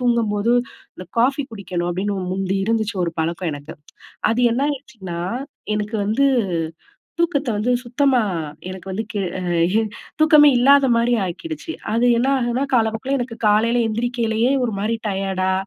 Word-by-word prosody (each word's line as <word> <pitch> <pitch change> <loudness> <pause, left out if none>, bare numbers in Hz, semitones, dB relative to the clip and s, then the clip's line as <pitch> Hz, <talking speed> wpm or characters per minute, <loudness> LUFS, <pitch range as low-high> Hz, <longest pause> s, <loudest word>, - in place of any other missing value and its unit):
தூங்கும்போது, 230 -3 +1 0.4
இந்த 185 - -8
காஃபி 270 +4 +3
குடிக்கணும் 180 -4 -3
அப்பிடின்னு 200 +3 -2 0.2
முந்தி 195 0 -1
இருந்துச்சு 220 -1 0
ஒரு 170 - -3
பழக்கம் 170 +2 -2
எனக்கு. 145 +2 -8 0.6
அது 230 +2 +1
என்ன 250 +4 0
ஆயிருச்சுன்னா, 245 -11 -6 0.6
எனக்கு 210 +1 -2
வந்து 225 +7 +2 0.9
தூக்கத்த 300 -5 +1
வந்து 235 +4 +1
சுத்தமா 255 0 +2 0.5
எனக்கு 190 0 -8
வந்து 215 +4 -2
கி 205 - -2 0.2
அ - - -5 0.8
தூக்கமே 305 -2 +7
இல்லாதமாரி 245 -3 +4
ஆக்கிடுச்சு, 320 - -6 0.2
அது 235 +2 +3
என்னாகுன்னா 255 -1 +1
காலப்போக்கில, 225 +4 0
எனக்கு 240 -2 -5
காலையில 230 +3 +3
எந்திரிக்கையிலேயே, 235 +1 0
ஒரு 230 -4 -2
மாதிரி 220 +3 0
டயர்டா, 190 -1 -1
230 Hz, 130 wpm, -21 LUFS, 200-255 Hz, 0.9 s, தூக்கமே